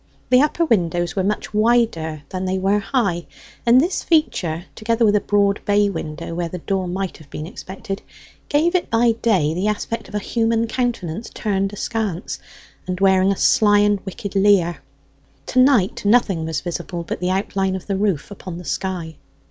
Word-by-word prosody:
The 250 +1 +7
upper 305 +3 +2
windows 175 - +1
were 190 - +1
much 210 +2 -2
wider 210 -9 +1
than 185 0 -3
they 185 0 0
were 195 +2 +2
high, 195 -6 -1 0.4
and 240 +2 +7
this 345 +7 +1
feature, 180 - +1
together 230 +1 +1
with 210 -1 +4
a 205 - +3
broad 200 -1 +1
bay 205 0 +2
window 160 -2 -5
where 170 0 -2
the 180 - -5
door 190 +1 -2
might 190 +1 -3
have 155 -3 -17
been 150 - -6
expected, 195 +3 -7 0.5
gave 315 +4 +2
it 365 - 0
by 230 +1 +3
day 205 -9 +1
the 185 +5 -1
aspect 215 +2 -2
of - - -8
a - - +2
human 225 +2 0
countenance 225 -5 -2
turned 195 -2 -1
askance, 205 -3 -3 0.5
and 180 -1 -3
wearing 190 0 +4
a 195 - -1
sly 210 -5 +4
and 205 0 +3
wicked 200 +1 -6
leer. 195 -4 +3 0.7
To 255 - 0
night 255 -8 +3
nothing 205 -6 +3
was 160 -3 -2
visible 175 0 -4
but - - -5
the 180 +1 -1
outline 190 0 0
of 190 - -6
the 200 - -1
roof 195 -4 -1
upon 185 -3 -7
the 180 - -9
sky. 175 -5 -3
195 Hz, 180 wpm, -21 LUFS, 180-225 Hz, 0.7 s, The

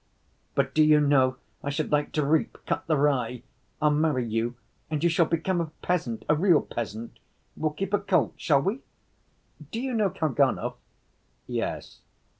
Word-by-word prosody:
But 135 -1 +1
do 155 - +4
you 150 0 +6
know, 135 -3 +3 0.3
I 140 - -2
should 150 +2 -2
like 145 0 +1
to 150 -2 +1
reap, 155 +2 +1
cut - - -2
the 155 -2 +2
rye? 125 -4 +1 0.4
I'll 150 -1 +3
marry 150 -4 +1
you, 115 +2 -1 0.3
and 155 0 -2
you 170 - +4
shall 165 0 +3
become 170 +2 0
a 165 - -3
peasant, 155 -11 -1
a 150 - +4
real 170 0 +4
peasant; 115 0 -6 0.4
we'll 155 - 0
keep 195 +5 -4
a 205 - +4
colt, 190 -6 +1
shall 140 -3 +2
we? 210 +7 -1 0.9
Do 225 - -4
you 260 +1 -2
know 215 -4 +2
Kalganov?" 155 -6 +1 0.7
"Yes." - - -4
150 Hz, 170 wpm, -27 LUFS, 135-170 Hz, 0.9 s, you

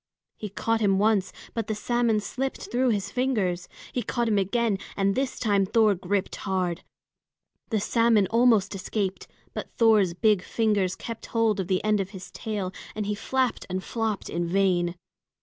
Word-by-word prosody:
He 210 - -6
caught 225 +3 0
him 195 -2 +3
once, 205 -2 +2 0.2
but 225 -2 -2
the 215 - -1
salmon 235 0 +1
slipped 265 +5 -4
through 250 +1 +2
his 205 -4 -1
fingers. 210 -9 0 0.3
He 250 - 0
caught 240 -1 -1
him 210 -2 +3
again, 205 +1 +1 0.2
and 195 0 +2
this 265 +2 -1
time 205 -4 +2
Thor 215 +2 +4
gripped 195 +1 -2
hard. 185 -3 -1 0.9
The 220 - +1
salmon 230 -1 +3
almost 230 -4 +4
escaped, 195 0 -3 0.3
but - - -5
Thor's 215 -6 +4
big 210 +1 +3
fingers 205 -3 +1
kept 230 -2 -7
hold 225 -3 +1
of 185 - -2
the 185 -1 0
end 215 -1 +2
of 195 -1 -2
his 185 - -10
tail, 200 -4 -4 0.2
and 210 -1 -2
he 210 - -1
flapped 255 +4 -1
and 185 +1 -2
flopped 225 -3 -2
in 170 0 -2
vain. 175 -1 +2
210 Hz, 170 wpm, -26 LUFS, 190-230 Hz, 0.9 s, Thor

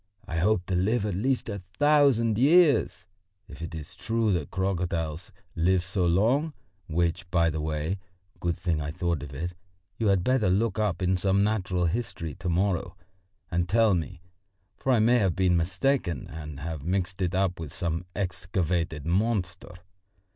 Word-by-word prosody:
I 85 - -4
hope 90 0 +2
to 95 - -3
live 100 +5 +1
at 105 - -1
least 125 +8 0
a 100 -2 -4 0.2
thousand 140 -7 +4
years, 145 - +4 0.4
if - - -11
it 85 0 -5
is 75 -2 -8
true 115 -2 0
that 80 -6 -2
crocodiles 90 -4 -2 0.2
live 90 +2 +2
so 90 0 0
long, 120 - +2 0.3
which, 85 +1 -1
by 85 -1 +2
the 80 0 -3
way 80 +4 -2 0.4
good 85 -1 -1
thing 85 -3 -1
I 75 - -3
thought 85 -2 -1
of 70 -1 -8
it 85 +5 -4 0.5
you 110 - +1
had 95 -3 +3
better 130 -5 +2
look 105 +2 +1
up 100 -3 0
in 90 +1 +2
some 95 +2 +2
natural 95 -4 0
history 85 -5 -3
to 90 - -2
morrow 95 +1 0 0.5
and 85 0 0
tell 110 0 +4
me, 85 0 -3 0.5
for 135 - -1
I 125 - +5
may 120 +3 +4
have 95 -6 +1
been 95 -2 +3
mistaken 95 +4 0
and 75 -2 -7
have 80 -1 -4
mixed 90 +3 -2
it 90 0 0
up 95 -2 0
with 80 -4 -6
some 85 +1 -3
excavated 85 -4 -2
monster. 90 -1 -1
90 Hz, 170 wpm, -27 LUFS, 85-105 Hz, 0.5 s, I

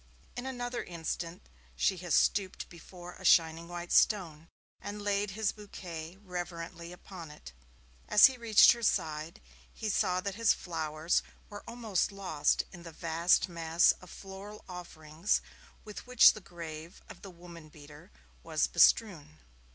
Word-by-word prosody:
In 245 +2 -5
another 245 -2 -4
instant 170 0 -6 0.3
she 125 - +1
has 175 -2 -1
stooped 195 -3 +1
before 175 +1 -12
a - - -12
shining 165 -2 +4
white 175 0 -7
stone, 165 -7 +2 0.3
and 205 +1 -6
laid 205 0 -1
his 220 -2 +1
bouquet 180 -5 -9
reverently 175 -2 -7
upon 180 -2 -10
it. - - -12 0.6
As 210 - +8
he 265 - +4
reached 230 -4 +6
her 235 - -2
side, 160 -6 -1 0.3
he 220 - -5
saw 180 -2 +1
that 200 +1 -4
his 225 +1 +3
flowers 160 -1 -1 0.3
were 205 - -8
almost 230 -6 -1
lost 190 -7 0
in 175 - -11
the 170 -1 -10
vast 165 +3 +2
mass 170 -1 +3
of 185 - -14
floral 195 +3 -10
offerings 170 -1 -2 0.5
with 210 +3 -9
which 250 -1 +7
the 215 - -10
grave 165 -1 -9
of - - -12
the 195 - -10
woman 170 -3 -13
beater 150 +4 -15 0.3
was 160 -2 0
bestrewn. 155 -9 +3
175 Hz, 145 wpm, -31 LUFS, 165-205 Hz, 0.6 s, As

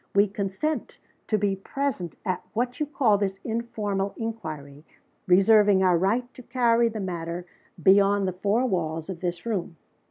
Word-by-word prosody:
We 200 +1 +5
consent 200 +10 -3 0.3
to 215 - +2
be 200 -1 +1
present 195 - -3
at, 185 - -1
what 245 +2 -2
you 300 - 0
call, 230 -8 +2
'this 195 -1 -2
informal 210 -4 -2
inquiry,' 155 -11 -6 0.4
reserving 195 +1 +5
our 180 -2 +4
right 200 +8 +1
to - - -11
carry 235 -1 +2
the 220 -1 -5
matter 175 -2 -4 0.4
beyond 195 0 +5
the 185 - -1
four 205 +7 +1
walls 165 -5 -2
of 175 - -7
this 175 +1 -4
room. 185 -7 -3
200 Hz, 155 wpm, -26 LUFS, 180-225 Hz, 0.4 s, We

